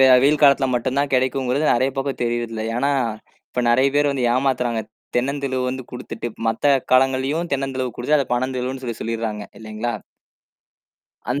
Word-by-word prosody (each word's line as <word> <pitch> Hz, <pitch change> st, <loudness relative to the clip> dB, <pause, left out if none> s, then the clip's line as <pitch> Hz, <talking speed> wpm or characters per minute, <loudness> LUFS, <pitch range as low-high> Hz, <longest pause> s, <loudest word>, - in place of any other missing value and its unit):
வெ 135 Hz, -, +8 dB, 0.2 s
வெயில் 150 Hz, +1 st, +3 dB
காலத்துல 140 Hz, -1 st, +5 dB
மட்டும்தான் 135 Hz, +3 st, 0 dB
கிடைக்கும்ங்கிறது 130 Hz, +2 st, +1 dB
நிறைய 130 Hz, +3 st, +2 dB
பேருக்கு 135 Hz, 0 st, -1 dB
தெரியறது 120 Hz, -1 st, -1 dB
இல்ல, 110 Hz, -, -3 dB
ஏன்னா, 140 Hz, +3 st, +1 dB, 0.6 s
இப்ப 125 Hz, -, -1 dB
நிறைய 130 Hz, +3 st, +4 dB
பேர் 145 Hz, 0 st, +3 dB
வந்து 130 Hz, -3 st, -1 dB
ஏமாத்துறாங்க. 125 Hz, -3 st, 0 dB, 0.3 s
தென்னந்தெளுவு 130 Hz, 0 st, -1 dB
வந்து 130 Hz, 0 st, -5 dB
குடுத்துட்டு, 125 Hz, -2 st, -6 dB, 0.2 s
மத்த 140 Hz, +6 st, +3 dB, 0.2 s
காலங்கள்லயும் 135 Hz, +6 st, +2 dB
தென்னந்தெளுவு 130 Hz, -3 st, -3 dB
குடுத்து 150 Hz, +5 st, +2 dB
அதை 135 Hz, -, 0 dB
பனந்தெளுவு 130 Hz, +1 st, -2 dB
சொல்லிச் 115 Hz, -2 st, -5 dB
சொல்லிடறாங்க, 110 Hz, -2 st, -3 dB, 0.2 s
இல்லிங்களா? 110 Hz, +2 st, -4 dB, 1.4 s
அந் 140 Hz, -, 0 dB
130 Hz, 145 wpm, -21 LUFS, 120-135 Hz, 1.4 s, வெ